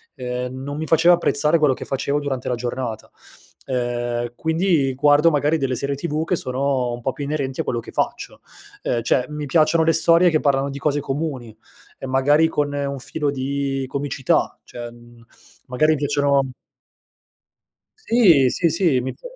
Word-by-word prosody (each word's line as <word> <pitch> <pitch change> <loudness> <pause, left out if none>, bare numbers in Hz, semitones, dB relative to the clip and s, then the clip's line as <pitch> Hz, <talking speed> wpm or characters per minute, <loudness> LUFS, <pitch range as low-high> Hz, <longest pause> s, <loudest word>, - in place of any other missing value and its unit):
Ehm, 125 0 -4
non 145 +1 -5
mi 160 - -3
faceva 165 +2 +5
apprezzare 155 -1 +2
quello 150 -3 +3
che - - -8
facevo 140 +2 -1
durante 135 -3 -4
la 125 - 0
giornata. 120 -2 -5 0.6
Ehm, 120 -1 -2
quindi 160 -4 +1
guardo 145 +4 +4
magari 150 +2 +1
delle 135 -3 -1
serie 140 +3 -2
TV 155 +2 -2
che 175 +3 0
sono 130 -2 -1
un 120 - -7
po' 135 - -1
più 140 +3 -6
inerenti 140 -3 -2
a - - -3
quello 120 - -2
che - - -10
faccio. - - -3 0.4
Ehm, 120 - -1
cioè 125 +2 +1
mi 150 0 -5
piacciono 155 +3 +3
le 165 - +3
storie 170 +2 +5
che 155 - +1
parlano 140 -1 +1
di 140 - -6
cose 145 -1 0
comuni 135 -6 -4 0.4
e - - -8
magari, 145 +5 +3
con 145 -2 -1
un 140 -1 -3
filo 145 +3 -3
di 135 0 -2
comicità, 140 -1 -1
cioè 120 -1 -8
mhmm, 120 0 -17 0.4
magari 155 +5 +2
piacciono 140 -1 +1 1.5
Sì, 190 - +4
sì, 170 +7 +1
sì. 165 -5 +2
Mi 130 +1 -4
s - - -34
140 Hz, 170 wpm, -21 LUFS, 130-155 Hz, 1.5 s, faceva